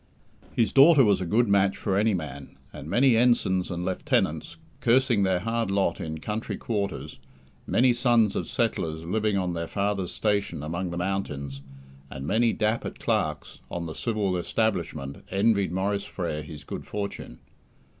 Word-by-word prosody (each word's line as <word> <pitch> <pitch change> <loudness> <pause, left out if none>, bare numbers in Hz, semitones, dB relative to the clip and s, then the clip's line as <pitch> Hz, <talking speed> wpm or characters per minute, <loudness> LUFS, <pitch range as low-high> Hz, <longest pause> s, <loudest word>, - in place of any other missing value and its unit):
His 115 - +1
daughter 140 +1 +7
was 100 -4 +3
a 90 - -2
good 115 +6 +3
match 100 -1 +3
for 95 - -1
any 105 +1 +3
man; 70 -5 -7 0.2
and 70 - -8
many 120 +5 +4
ensigns 110 -6 +2
and 90 0 -3
lieutenants, 95 0 -1 0.2
cursing 120 -2 +3
their 95 -2 +2
hard 115 0 -1
lot 95 -3 0
in 80 0 -4
"country 105 +7 -4
quarters", 100 - -3 0.5
many 125 +1 +4
sons 120 -4 +3
of - - -2
settlers 85 - -1
living 105 +3 0
on 90 -2 -1
their 85 -1 -3
father's 100 -1 -1
station 100 -8 -1
among 85 +4 -3
the 85 - -5
mountains, 70 -8 -3 0.5
and 70 0 -7
many 115 +8 +2
dapper 110 +2 0
clerks 75 -1 -2
on 85 -1 -4
the 80 - -5
civil 105 -4 -1
establishment 85 -9 -2
envied 100 -2 +2
Maurice 100 +2 -1
Frere 80 -5 -4
his 75 -1 -10
good - - -7
fortune. 100 -11 -5
100 Hz, 155 wpm, -26 LUFS, 85-110 Hz, 0.5 s, daughter